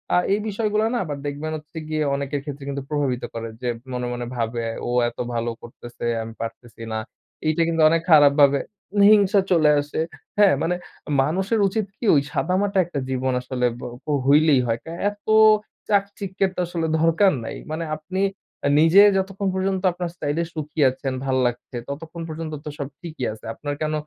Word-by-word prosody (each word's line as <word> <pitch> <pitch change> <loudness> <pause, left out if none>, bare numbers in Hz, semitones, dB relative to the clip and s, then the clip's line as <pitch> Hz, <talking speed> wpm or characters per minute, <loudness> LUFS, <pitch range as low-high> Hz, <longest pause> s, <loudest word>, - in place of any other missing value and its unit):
আ - - +5 0.2
এই 205 - +1
বিষয়গুলো 215 0 0
না - - +1
আবার 145 -3 -4
দেখবেন 145 +2 -4
হচ্ছে 155 +2 -13
গিয়ে 155 -1 0
অনেকের 140 0 -3
ক্ষেত্রে 145 -1 -7
কিন্তু 140 -1 -4
প্রভাবিত 140 -5 -1
করে, 115 0 -4
যে 125 - -3 0.3
মনে, 125 0 -2
মনে, 120 0 -4
ভাবে। 115 0 -2 0.2
ও - - -2 0.2
এত - - -19 0.2
ভালো 115 0 -1
করতেছে, 120 0 -9 0.2
আমি 115 - -8
পারতেছি 115 0 -7
না। - - -1 0.5
এইটা 155 +2 +2
কিন্তু 165 -1 +1
অনেক 165 0 +2
খারাপ 145 -2 +8
ভাবে 140 -1 +6 0.5
হিংসা 205 -1 +5
চলে 155 -4 +5
আসে। 145 +2 -5 0.4
হ্যাঁ, 205 -2 +6
মানে 175 +2 +1 0.5
মানুষের 190 +8 0
উচিত 215 +2 -1
কি - - -5
ওই 140 - +5
সাদামাটা 195 +2 0
একটা 165 -4 -4
জীবন 130 0 0
আসলে 125 0 -2
বো 125 - -6 0.2
পো - - -2 0.2
হইলেই 145 -1 +5
হয়। 115 0 0
কা 160 - -7 0.2
এত 205 0 -14 0.6
চাকচিক্যের 200 -2 0
তো - - -5
আসলে 165 -2 -2
দরকার 165 +4 +4
নাই। - - -5 0.2
মানে 160 +2 -2
আপনি 185 +5 -4 0.6
নিজে 165 +6 +7 0.2
যতক্ষণ 195 +1 -2
পর্যন্ত 190 0 0
আপনার 175 0 -4
স্টাইল 145 -1 -2
এ - - +1
সুখী 155 0 -6
আছেন, 130 +1 -4
ভাল 130 -1 +1
লাগছে 120 0 -5
ততক্ষণ 160 +4 -7
পর্যন্ত 155 0 -5
তো - - -3
সব 140 - -3
ঠিকই 160 -7 -5
আছে। 110 - -14
আপনার 145 +3 -4
কেন 155 0 0
155 Hz, 180 wpm, -23 LUFS, 135-185 Hz, 0.6 s, খারাপ